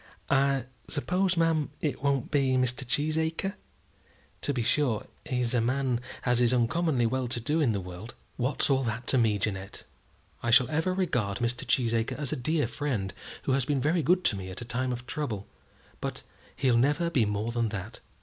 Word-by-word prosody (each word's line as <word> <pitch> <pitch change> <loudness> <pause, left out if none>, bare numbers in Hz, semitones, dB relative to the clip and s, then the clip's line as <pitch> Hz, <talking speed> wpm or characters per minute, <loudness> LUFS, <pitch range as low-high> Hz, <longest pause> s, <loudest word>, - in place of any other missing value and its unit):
"I 135 -1 +3 0.3
suppose, 180 +4 0
ma'am, 165 -3 +2
it 150 - -2
won't 140 -3 0
be 135 -3 +2
Mr. 130 0 +1
Cheesacre? 160 +7 0 0.9
To - - +1
be 125 -4 -1
sure, 125 -4 +1 0.2
he's 125 -2 0
a 120 - +3
man 130 0 +1 0.3
as 125 0 +3
is 120 +1 +4
uncommonly 125 +2 +2
well 130 +2 0
to 120 0 -1
do 150 +7 0
in 135 -6 +3
the 100 - -1
world." 90 +5 -8 0.2
"What's 130 +3 +1
all 135 -1 +3
that 115 +1 -3
to 130 - +5
me, 110 -3 +3
Jeannette? 100 -1 -4 0.6
I 120 - -1
shall 125 +3 +6
ever 160 +4 +1
regard 120 - 0
Mr. 120 +3 -1
Cheesacre 115 -3 +1
as 140 -3 -2
a - - 0
dear 150 +4 +1
friend 115 -11 -2 0.3
who - - 0
has 135 0 +2
been 145 -1 +1
very 160 +6 +2
good 180 +4 +3
to - - +2
me 95 -1 -6
at 95 - -6
a - - -5
time 125 +2 -1
of 120 0 -5
trouble; 125 -8 -3 0.5
but - - -4 0.3
he'll 130 -4 +3
never 145 +7 +2
be 125 -8 +3
more 105 +2 -1
than 115 -1 0
that." 100 +1 -6
125 Hz, 190 wpm, -28 LUFS, 115-145 Hz, 0.9 s, shall